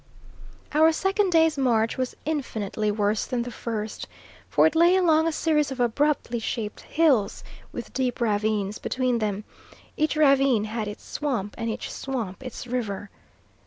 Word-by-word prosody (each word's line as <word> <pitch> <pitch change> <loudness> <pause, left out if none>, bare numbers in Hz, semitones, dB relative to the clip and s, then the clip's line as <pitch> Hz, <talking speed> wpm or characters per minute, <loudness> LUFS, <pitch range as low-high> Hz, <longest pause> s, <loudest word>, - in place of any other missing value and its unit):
Our 315 +2 +6
second 390 +3 +1
day's 320 -3 +4
march 230 -4 +2
was 255 -1 -3
infinitely 220 -8 -2
worse 210 0 +1
than 245 -2 -1
the 245 - -6
first, 220 -2 -5 0.4
for - - +4
it - - +3
lay 340 +3 +5
along 325 -3 +4
a - - +1
series 305 -2 +1
of 265 -1 -6
abruptly 245 0 +1
shaped 220 -2 -4
hills 275 -11 +2 0.3
with - - -7
deep 255 -2 -1
ravines 210 -2 0
between 255 -2 0
them; 210 -1 -2 0.5
each 310 +1 +1
ravine 275 -6 +4
had 215 0 -3
its 205 - -7
swamp 240 -9 -3
and 230 - -3
each 220 - -4
swamp 235 -8 -4
its 255 -1 -7
river. 210 -5 -3
245 Hz, 155 wpm, -25 LUFS, 215-300 Hz, 0.5 s, Our